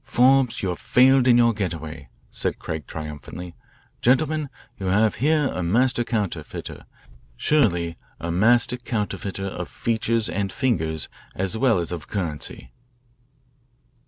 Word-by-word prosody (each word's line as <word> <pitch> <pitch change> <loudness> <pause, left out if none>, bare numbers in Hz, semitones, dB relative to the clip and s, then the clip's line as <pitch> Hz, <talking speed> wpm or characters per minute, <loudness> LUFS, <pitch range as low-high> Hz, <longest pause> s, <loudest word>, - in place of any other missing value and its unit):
"Forbes, 130 -1 +3
you 95 - 0
have 90 - -3
failed 130 0 +4
in 120 -1 +6
your 115 -1 +5
get 95 -5 -2
away," 75 -4 -9 0.2
said - - -2
Craig 80 -2 -5
triumphantly. 80 +3 -7 0.5
"Gentlemen, 150 +3 +2 0.3
you 95 - -3
have 105 +3 +3
here 150 -1 +3
a 90 - -3
master 120 +8 +2
counterfeiter, 110 -6 -4 0.5
surely 85 - +2 0.2
a 85 - -3
master 120 +7 +3
counterfeiter 105 -5 -3
of 90 -2 -5
features 115 -1 0
and 100 +1 -2
fingers 80 - 0 0.3
as 95 +2 -1
well 115 -3 +3
as 85 -1 -2
of 85 -3 -5
currency." 75 - -4
105 Hz, 130 wpm, -24 LUFS, 85-125 Hz, 0.5 s, in